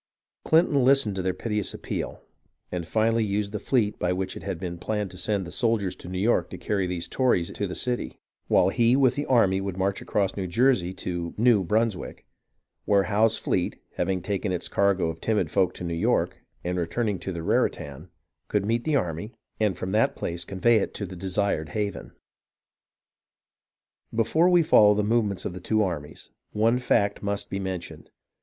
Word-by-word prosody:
CHnton 160 -4 +4
listened 135 -5 +4
to 95 - -3
their 95 0 0
piteous 105 0 -3
appeal, - - -5 0.5
and 85 -2 -4
finally 115 +2 +2
used 100 0 -1
the 105 - -3
fleet 110 -4 0
by 90 - 0
which 95 +1 -2
it - - -7
had 95 -4 -4
been 85 -2 -5
planned 105 0 -2
to 90 - -11
send 100 0 -1
the 85 - -8
soldiers 110 -6 0
to - - -11
New 90 - -4
York 110 +6 +2
to - - -7
carry 100 -3 -1
these 90 -2 -3
Tories 120 -10 +1
to 100 - -3
the 90 - -6
city; 125 -1 -2 0.3
while 90 - +4
he 120 +3 +3
with 130 -3 +4
the 145 - -3
army 100 -7 +3
would 95 -2 -4
march 95 +1 0
across 100 -2 -1
New 95 -2 -3
Jersey 100 -2 +2
to 85 -2 -4
[New] 115 -3 +4
Brunswick, 110 +2 -1 0.6
where 100 -1 +4
Howe's 110 +2 +2
fleet, 90 - -1 0.2
having 90 0 -1
taken 100 0 -2
its 90 - -2
cargo 100 -3 +2
of 80 0 -4
timid 110 -2 0
folk 95 -3 +2
to - - -8
New 85 -1 -3
York, 85 - 0 0.2
and 90 +1 -1
returning 100 +3 -1
to 95 - -5
the 85 -2 -5
Raritan, 75 0 -1 0.4
could 105 -2 0
meet 115 +2 0
the 155 -2 +1
army, 90 - -2 0.3
and 105 -5 +1
from 95 +1 -4
that 110 +2 +2
place 85 0 -4
convey 110 +5 +2
it 100 - -2
to 100 - -4
the 95 0 -9
desired 95 -3 -1
haven. 105 -2 -3 2.0
Before 155 +10 +3
we 175 -2 +5
follow 105 -8 +6
the 105 - +1
movements 105 -3 0
of - - -3
the 90 - -8
two 110 +3 +1
armies, 80 -5 -5 0.2
one 115 +3 +2
fact 100 -4 +1
must 100 0 -3
be 100 - -2
mentioned. 95 -2 -6
100 Hz, 190 wpm, -26 LUFS, 90-110 Hz, 2.0 s, follow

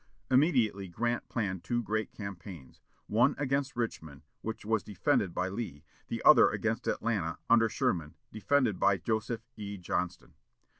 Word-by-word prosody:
Immediately 125 - +3
Grant 120 +6 -2
planned 95 -6 -2
two 120 -1 -1
great 110 0 -2
campaigns: 90 - -9 0.2
one 125 +7 +3
against 140 -1 -1
Richmond, 80 -11 -4 0.2
which 110 -1 -5
was 110 -1 +1
defended 95 -1 0
by 90 +2 -1
Lee; 95 -7 -5 0.2
the - - -4
other - - +8
against - - -2
Atlanta, 100 -8 -1
under 115 -1 +6
Sherman, 80 -6 -1 0.2
defended 110 -2 +1
by 100 - +4
Joseph 110 +4 -2
E. 100 -1 -5
Johnston. 90 -1 -3
105 Hz, 140 wpm, -31 LUFS, 90-120 Hz, 0.2 s, other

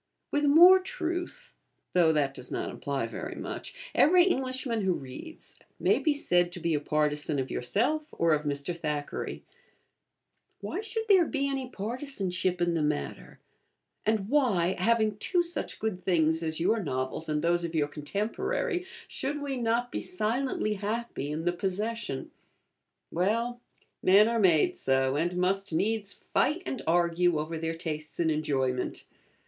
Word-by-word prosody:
With 290 0 +1
more 350 +6 +9
truth 350 -1 -5 0.4
(though 170 -3 +5
that 145 -3 +1
does 125 - -10
not - - -3
imply 140 -4 -3
very 115 - -6
much) - - -7
every 355 +3 +6
Englishman 260 - 0
who 190 -2 +2
reads 135 - -9 0.2
may - - +3
be 305 -3 +2
said 175 -10 +2
to 175 - -6
be 170 -1 0
a 150 - +2
partisan 150 0 0
of 130 -1 -2
yourself 255 - 0
or 165 -1 +2
of 150 - +1
Mr. 145 +3 -2
Thackeray. 150 -3 -4 1.2
Why - - -4
should 445 +1 -3
there 375 -6 +6
be 280 -2 -1
any 270 -2 -3
partisanship 200 -6 -2
in 175 -1 +1
the 165 - 0
matter; 150 0 -3 0.7
and 215 -2 +1
why, 205 -10 +2
having 220 +1 +2
two 350 - +1
such 345 0 -4
good 200 -5 -3
things 160 -3 +2
as 160 -1 -3
your 215 +6 +2
novels 130 0 -3
and 150 0 0
those 170 +1 +2
of 170 -1 -4
your 150 -2 +2
contemporary, 360 - -2 0.2
should 290 +2 -3
we 285 -2 -3
not 240 0 0
be - - -3
silently 250 -7 -1
happy 210 - -3
in 155 +2 -3
the 175 - +2
possession? 195 -4 -3 0.8
Well, 230 +7 0 0.4
men 200 +3 +6
are 230 0 +1
made 175 -7 +4
so, 135 0 +1
and 175 +4 0
must 195 +2 0
needs 200 +4 0
fight 305 +7 0
and 265 - -3
argue 170 0 +3
over 155 +2 -3
their 165 0 -2
tastes 155 -3 -5
in 165 -2 +2
enjoyment. 135 -4 -1
185 Hz, 155 wpm, -29 LUFS, 155-255 Hz, 1.2 s, more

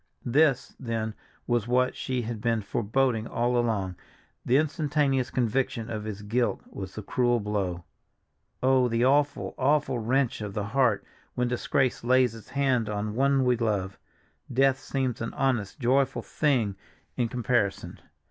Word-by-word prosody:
This, 135 +1 +2
then, 115 -3 -3 0.3
was 120 -2 0
what 125 +1 +2
she 130 -2 -2
had 115 -1 -5
been 115 -2 0
foreboding 115 +3 0
all 120 +1 0
along; 105 -6 0 0.5
the 125 - +3
instantaneous 145 -4 +1
conviction 120 -1 -1
of 105 -1 -4
his 105 -1 -6
guilt 120 +4 0
was 95 -1 -7
the 110 - -6
cruel 120 +3 +1
blow. 100 -4 -2 0.8
Oh, 130 -1 +4
the 115 0 +1
awful, 145 +2 +2
awful 135 -2 +2
wrench 125 +1 0
of 105 -2 -5
the 105 - -1
heart, 115 -1 +1 0.3
when 125 0 +1
disgrace 125 +1 0
lays 125 -1 +3
its 115 -2 -12
hand 130 -5 +1
on 105 0 -2
one 135 +2 +3
we 125 -1 +4
love! 100 -4 -1 0.5
Death 135 +1 +3
seems 130 -3 -2
an 115 - -4
honest, 125 -8 0
joyful 130 -1 +1
thing 125 -10 +1 0.4
in 120 -2 +1
comparison. 120 -4 -1
120 Hz, 150 wpm, -27 LUFS, 110-130 Hz, 0.8 s, Oh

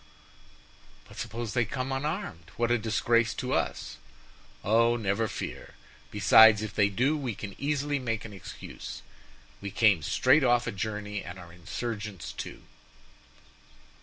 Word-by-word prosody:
"But - - -14
suppose 115 0 -4
they 120 - +3
come 130 +4 -3
unarmed? 135 - -3
What 120 0 +1
a 120 - +3
disgrace 115 +1 +2
to - - -2
us." - - -2 0.7
"Oh, 115 +3 +4
never 110 0 0
fear! - - -6 0.3
besides, 105 +1 +7
if 110 - -5
they 100 -1 +3
do, 125 +10 +1
we 130 -8 -3
can 100 0 -7
easily 145 0 0
make 115 -4 -3
an 110 - -9
excuse; 95 - -9 0.6
we 100 - -4
came 100 -4 +4
straight 130 - +3
off 120 -1 +3
a 115 - -2
journey 105 0 -4
and 90 +2 -8
are 85 -2 -12
insurgents, 105 +2 -5
too." - - -7
110 Hz, 140 wpm, -28 LUFS, 100-120 Hz, 0.7 s, besides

